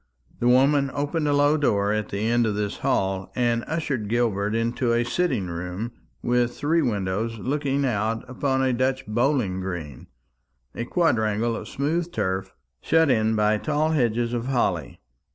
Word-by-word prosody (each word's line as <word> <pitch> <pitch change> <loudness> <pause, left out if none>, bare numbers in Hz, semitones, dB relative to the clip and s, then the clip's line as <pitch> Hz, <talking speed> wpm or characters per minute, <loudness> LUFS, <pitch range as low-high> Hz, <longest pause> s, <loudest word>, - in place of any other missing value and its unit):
The 120 - +1
woman 140 +3 +4
opened 145 +2 -1
a 145 - +2
low 145 +2 +4
door 105 -8 +1
at 110 -1 -2
the 100 - -3
end 120 0 +2
of 105 - -1
this 105 -1 -2
hall, 95 -1 -1
and 120 -1 +1
ushered 145 -9 -2
Gilbert 110 -3 0
into 115 +1 0
a 120 0 +2
sitting 120 - 0
room 90 +6 -5 0.3
with 120 0 +1
three 160 +3 +2
windows 110 -2 -1
looking 140 +3 -1
out 110 -1 -1
upon 130 +1 0
a 130 -1 +2
Dutch 130 +2 0
bowling 115 -4 0
green, 85 -8 -6 0.7
a 120 - -4
quadrangle 115 - +1
of - - -6
smooth 165 +5 -1
turf 95 - -2 0.3
shut 160 -2 +3
in 110 -2 +2
by 105 0 +2
tall 155 +3 0
hedges 120 -5 +1
of 120 +1 -2
holly. 130 -3 -1
120 Hz, 160 wpm, -24 LUFS, 105-140 Hz, 0.7 s, woman